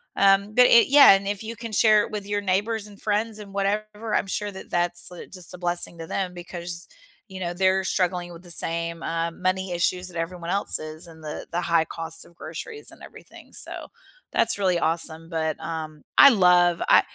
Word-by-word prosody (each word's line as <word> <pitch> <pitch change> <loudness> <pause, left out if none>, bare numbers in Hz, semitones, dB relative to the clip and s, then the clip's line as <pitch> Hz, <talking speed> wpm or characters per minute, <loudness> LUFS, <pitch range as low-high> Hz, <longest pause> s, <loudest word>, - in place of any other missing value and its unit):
um, 200 +1 +3
but, 250 +1 +6
eh, 235 - +7
yeah, 280 -3 +8
and 195 0 0
if 205 0 -3
you 230 +1 -6
can 230 0 -8
share 215 0 +4
it - - -7
with 205 -1 -5
your 205 0 -1
neighbors 205 +3 -1
and 205 -1 -14
friends 215 +1 -1
and 200 -1 -11
whatever, 210 +2 -3
I'm 195 - +1
sure 205 +1 -2
that 190 - -11
that's, 175 +1 +1
uh, 175 - -9
just 185 -2 -2
a - - -8
blessing 175 -1 0
to 165 - -6
them 185 -2 -3
because, 175 0 -5 0.4
you 190 -1 -9
know, 175 -1 -3
they're 190 +1 +1
struggling 180 -2 -1
with 170 +2 -13
the 175 - -5
same, 165 0 +1
uh, 165 0 -2
money 185 +1 -2
issues 180 +1 -1
that 170 - -10
everyone 170 +1 -5
else 200 +1 +3
is 155 +2 -6
and 160 -1 -15
the 150 - -7
the 175 +1 -1
high 170 -1 +2
cost 165 0 -4
of 170 - -20
groceries 440 - -8
and - - -17
everything, - - -15
so, - - -4 0.4
that's - - +2
really 185 -3 +2
awesome. 165 0 +1
But, 160 -2 -3
um, 155 -2 -6
I 280 - +9
love 180 -5 +4
I - - +6
180 Hz, 210 wpm, -24 LUFS, 170-205 Hz, 0.4 s, I